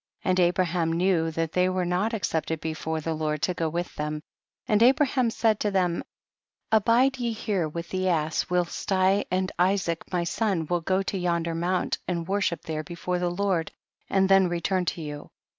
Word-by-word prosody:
And 185 -1 +2
Abraham 175 -1 +2
knew 170 -1 +2
that 160 0 -2
they 180 +1 +2
were 185 -1 0
not 180 +5 0
accepted 165 -6 -1
before 160 0 -3
the 165 +1 -2
Lord 155 -1 -2
to 180 - +1
go 165 -2 -1
with 175 +2 -3
them, 150 0 -3 0.4
and 210 0 +3
Abraham 260 0 +4
said 225 -2 +1
lo 210 - +2
them, 180 -3 0 0.7
abide 235 +4 +3
ye 235 -2 -1
here 200 -7 -1
with 170 +2 -6
the 185 0 0
ass 160 +1 0
whilst 180 +2 -1
I 190 +1 +3
and 185 +1 0
Isaac 180 -2 0
my 180 -2 0
son 175 -1 0
will 175 +2 -1
go 190 +3 +1
to 195 0 -3
yonder 170 -2 0
mount 175 +2 -1
and 170 -2 -2
worship 190 -4 0
there 155 -2 -3
before 175 +2 -3
the 175 0 0
Lord 180 -2 -1 0.4
and 195 -1 +3
then 195 -1 +5
return 180 +2 0
to 170 - -3
you. 150 -1 -7
180 Hz, 185 wpm, -26 LUFS, 165-195 Hz, 0.7 s, then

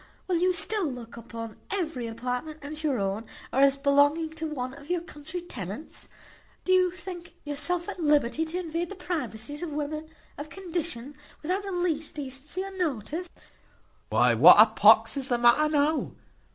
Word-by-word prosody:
Will 360 -2 +1
you 365 +2 +3
still 375 +1 0
look 240 -2 -9
upon 230 -1 -8
every 315 -11 -2
apartment 250 +7 -4
as 305 +2 -5
your 285 -5 +1
own, 200 +2 -2 0.3
or - - +2
as 275 0 +5
belonging 285 +3 +3
to 320 0 -4
one 255 -4 -4
of 285 +3 -13
your 355 -1 0
country 325 0 -7
tenants? 225 - -7 0.6
Do 370 - +1
you 365 -1 +5
think 355 -1 -9
yourself 305 +4 -1
at - - -6
liberty 295 -2 +2
to 325 +3 -5
invade 335 0 -3
the 400 - -7
privacies 290 - -4
of 345 -3 -4
women 305 +1 -4 0.3
of 295 +1 -6
condition, 330 -8 -4 0.3
without 365 +6 0
the 395 - -5
least 335 -4 -1
decency 290 +5 -4
or 390 0 -8
notice?" 325 - -2 0.8
"Why, - - +4
what - - +9
a - - +11
pox - - +5
is 270 0 -1
the 245 - +2
matter 240 +6 +5
now?" 300 +1 +1
305 Hz, 170 wpm, -27 LUFS, 265-345 Hz, 0.8 s, a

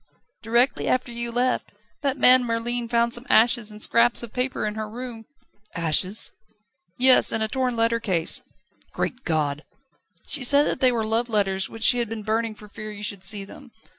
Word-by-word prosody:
"Directly 235 +3 +1
after 255 -1 -1
you 235 0 -4
left. 250 +2 -1 0.3
That 280 -1 -1
man 255 -1 +7
Merlin 235 0 -3
found 235 0 0
some 240 +3 -3
ashes 230 0 +3
and 210 0 -12
scraps 240 +1 +2
of 235 - -9
paper 255 -2 -2
in 210 - -3
her 215 0 -6
room 235 -1 -9 0.3
..." 210 +1 -26
"Ashes?" 170 +5 +1 0.7
"Yes; 255 0 +7
and 220 - -1
a - - 0
torn 255 +1 -2
letter 230 0 +1
case." 180 -7 0 0.5
"Great 250 - -4
God!" 150 -2 -2 0.6
"She 285 - +1
said 285 +3 +6
that - - -2
they 255 -1 +4
were 230 -2 -1
love 230 +2 0
letters, 195 -3 -1
which 225 0 -10
she 245 - +4
had 235 -2 -2
been 225 -1 -6
burning 220 +1 -2
for 210 - -15
fear 215 +1 -9
you 205 0 -9
should 200 -2 -5
see 195 +1 -1
them." 265 +6 -14
230 Hz, 195 wpm, -23 LUFS, 210-245 Hz, 0.7 s, man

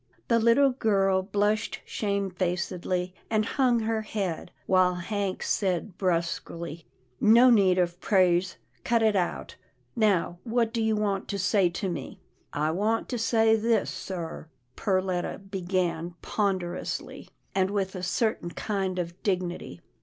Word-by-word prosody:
The 230 -1 +4
little 235 +5 +5
girl 195 -6 +2
blushed 205 +3 0
shamefacedly, 185 -2 -2 0.2
and 215 -1 +2
hung 245 -2 +2
her 220 0 0
head, 195 -6 -3 0.2
while 185 -1 +3
Hank 195 +1 -3
said 185 -1 -1
brusquely, 170 -2 -2 0.2
" 125 0 -40
No 235 +4 +7
need 195 -5 +4
of 175 -1 0
praise 185 -2 +2
— - - -38
cut 230 -1 +2
it 215 -2 +3
out, 180 -3 -2 0.4
now 195 -6 +1
what 230 -1 0
do 230 - 0
you 220 0 +2
want 200 -2 -1
to 200 - -3
say 185 0 +3
to 185 +3 -3
me? 165 -7 -5
" - - -40
" - - -44
I 150 +2 0
want 215 +6 0
to 245 - -2
say 225 0 +4
this 225 -1 +1
sir," 170 -4 -6 0.3
Perletta 185 -2 -1
began 180 -3 -2
ponder 185 -4 -1
ously, - - -6 0.2
and 190 -1 +2
with 195 -2 -1
a 185 - -5
certain 185 0 0
kind 190 0 -2
of 175 0 -4
dignity. 180 - -2
190 Hz, 150 wpm, -27 LUFS, 180-215 Hz, 0.4 s, No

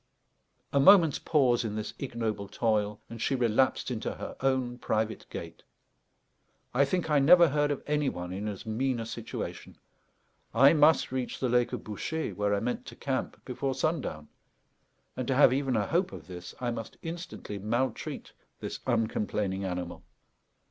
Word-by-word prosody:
A 140 - +4
moment's 165 -1 +7
pause 130 -7 +3
in 105 -2 -3
this 110 0 -4
ignoble 110 -6 -3
toil, 105 -1 0
and 115 -1 -8
she 135 - +1
relapsed 125 +1 +2
into 115 -2 -3
her - - -7
own 130 -2 0
private 110 -1 -1
gait. - - -7 1.1
I 135 +3 +4
think 175 +4 -1
I 150 - +5
never 170 +4 +7
heard 145 +1 +1
of 145 - -2
any 150 -1 +1
one 90 -3 -5
in 100 +3 -4
as 100 0 -5
mean 120 +3 -1
a 115 - -3
situation. 115 0 -6 0.8
I 135 +6 +7
must 155 -2 +4
reach 130 -2 -3
the 130 - 0
lake 120 0 +2
of - - -4
Bouchet, 155 +9 -3
where 105 0 +1
I - - 0
meant 125 +3 -3
to - - -9
camp, 135 -2 -3
before 135 +1 -2
sundown, 135 - -2 0.9
and, 130 - -3
to 135 - +1
have 130 -2 +6
even 135 -2 0
a 105 -2 +1
hope 180 +3 +1
of - - -9
this, 90 -1 -9
I 125 -1 -1
must 115 -1 -6
instantly 165 - -6
maltreat 115 +4 -2 0.3
this - - -5
uncomplaining 105 -4 0
animal. 90 -1 -4
125 Hz, 165 wpm, -29 LUFS, 105-140 Hz, 1.1 s, moment's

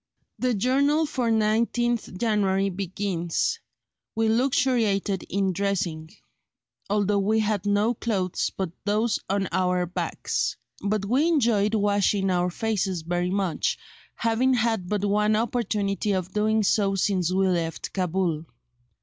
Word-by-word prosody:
The 250 -2 +1
journal 280 +8 +2
for 255 -5 -1
19th 225 0 +1
January 195 -3 +1
begins: 185 -2 -2 0.6
"We 225 0 +2
luxuriated 225 -5 +1
in 195 0 0
dressing, 175 -5 -2 0.8
although 205 0 +2
we 210 +3 +1
had 210 -2 -1
no 205 +3 +2
clothes 195 -6 -1
but 190 -4 -4
those 210 +2 +1
on 195 0 0
our 180 -1 +1
backs; 175 - -2 0.3
but 205 0 0
we 260 +10 +2
enjoyed 225 -9 +2
washing 200 -1 +2
our 180 0 +1
faces 190 -3 -2
very 175 +2 -1
much, 190 -3 0 0.4
having 235 +3 +2
had 225 -6 0
but 205 -1 0
one 210 +1 +2
opportunity 215 -3 -1
of 185 -1 -3
doing 215 +1 +2
so 195 -1 +2
since 185 -3 +1
we 190 +1 +2
left 170 -3 -2
Cabul. 180 -3 -1
205 Hz, 125 wpm, -25 LUFS, 190-225 Hz, 0.8 s, journal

